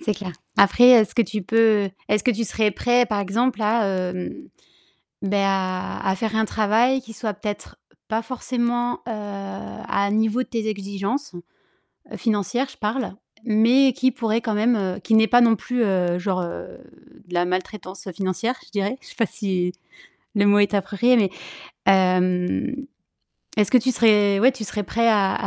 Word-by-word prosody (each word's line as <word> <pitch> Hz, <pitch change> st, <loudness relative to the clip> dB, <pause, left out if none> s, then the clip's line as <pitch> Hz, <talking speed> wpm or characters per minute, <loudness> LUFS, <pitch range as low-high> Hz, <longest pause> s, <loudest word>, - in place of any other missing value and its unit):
c'est 215 Hz, -11 st, -1 dB
clair. 185 Hz, -4 st, -7 dB, 0.2 s
Après, 200 Hz, +5 st, +5 dB
est-ce 230 Hz, -5 st, +6 dB
que 235 Hz, -, +4 dB
tu 215 Hz, -3 st, -4 dB
peux, 220 Hz, -1 st, +3 dB, 0.2 s
est-ce 210 Hz, -1 st, +1 dB
que 250 Hz, -, +2 dB
tu 230 Hz, 0 st, -1 dB
serais 215 Hz, +1 st, 0 dB
prêt, 245 Hz, +5 st, +2 dB
par 215 Hz, -3 st, -2 dB
exemple, 225 Hz, +6 st, 0 dB
à 220 Hz, +1 st, +2 dB
hem, 185 Hz, -1 st, -3 dB, 0.9 s
ben 200 Hz, +1 st, -1 dB
à 190 Hz, -1 st, -1 dB
à 190 Hz, -, +1 dB
faire 220 Hz, +2 st, -3 dB
un 220 Hz, 0 st, +2 dB
travail 225 Hz, +6 st, +2 dB
qui 225 Hz, -3 st, -12 dB
soit 215 Hz, 0 st, -4 dB
peut-être 205 Hz, +1 st, -7 dB, 0.3 s
pas 220 Hz, 0 st, -1 dB
forcément, 240 Hz, 0 st, -2 dB
heu, -, -, -33 dB, 0.8 s
à 200 Hz, -, 0 dB
un 200 Hz, -, -1 dB
niveau 220 Hz, +3 st, +1 dB
de -, -, -14 dB
tes 225 Hz, -3 st, -3 dB
exigences- 200 Hz, +4 st, -4 dB, 0.8 s
financières, 235 Hz, +4 st, -1 dB
je -, -, -16 dB
parle- 220 Hz, +3 st, -3 dB, 0.3 s
mais 245 Hz, +4 st, +4 dB
qui 260 Hz, +2 st, +1 dB
pourrait 230 Hz, -4 st, -1 dB
quand 225 Hz, -2 st, -2 dB
même 210 Hz, -4 st, 0 dB
qui 220 Hz, -, +1 dB
n'est 220 Hz, 0 st, +5 dB
pas 245 Hz, +2 st, +5 dB
non 230 Hz, -2 st, +5 dB
plus, 250 Hz, +3 st, -2 dB
heu, 180 Hz, -3 st, 0 dB
genre, 185 Hz, 0 st, -1 dB
heu, 170 Hz, -, -7 dB, 0.5 s
de 180 Hz, -, -8 dB
la 175 Hz, 0 st, +2 dB
maltraitance 185 Hz, +1 st, -5 dB
financière, 200 Hz, +8 st, -2 dB
je -, -, -20 dB
dirais. 205 Hz, +3 st, -2 dB
Je -, -, -16 dB
sais -, -, -13 dB
pas 230 Hz, -, +1 dB
si 185 Hz, -3 st, -2 dB, 0.6 s
le 205 Hz, -1 st, +3 dB
mot 205 Hz, 0 st, +5 dB
est 205 Hz, 0 st, +2 dB
approprié, 205 Hz, +5 st, +2 dB
mais, 210 Hz, -5 st, +3 dB, 0.6 s
hem, 185 Hz, +8 st, +1 dB, 0.7 s
est-ce 210 Hz, -2 st, +2 dB
que 255 Hz, -, +7 dB
tu 255 Hz, +2 st, +1 dB
serais, 210 Hz, -4 st, +3 dB
ouais, 250 Hz, +5 st, +5 dB
tu 255 Hz, -4 st, -8 dB
serais 210 Hz, 0 st, -4 dB
prêt 230 Hz, +4 st, 0 dB
à 200 Hz, -3 st, +2 dB
215 Hz, 175 wpm, -22 LUFS, 195-235 Hz, 0.9 s, que